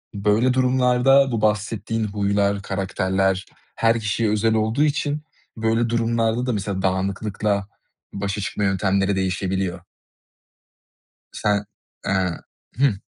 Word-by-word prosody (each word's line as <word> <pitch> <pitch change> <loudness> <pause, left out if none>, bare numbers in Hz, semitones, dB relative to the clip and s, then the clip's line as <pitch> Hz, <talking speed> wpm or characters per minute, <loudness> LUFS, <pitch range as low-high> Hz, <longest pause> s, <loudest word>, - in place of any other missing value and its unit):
Böyle 105 +5 +2
durumlarda 130 +1 +4
bu 115 -2 -1
bahsettiğin 110 +1 0
huylar, 100 -1 0
karakterler 95 0 0 0.3
her 115 0 +2
kişiye 110 +1 0
özel 110 +1 +2
olduğu 110 +6 +1
için 150 0 0 0.3
böyle 115 +1 +1
durumlarda 115 0 +1
da, 125 - 0
mesela, 100 -2 -2
dağınıklıkla 100 +2 -1 0.5
başa 100 +1 -3
çıkma 105 +1 -3
yöntemleri 95 0 +1
değişebiliyor. 95 0 -1 1.5
Sen, 105 0 0 0.4
eee 95 -3 0 0.4
Hıh. 135 -5 +4
105 Hz, 105 wpm, -22 LUFS, 95-115 Hz, 1.5 s, durumlarda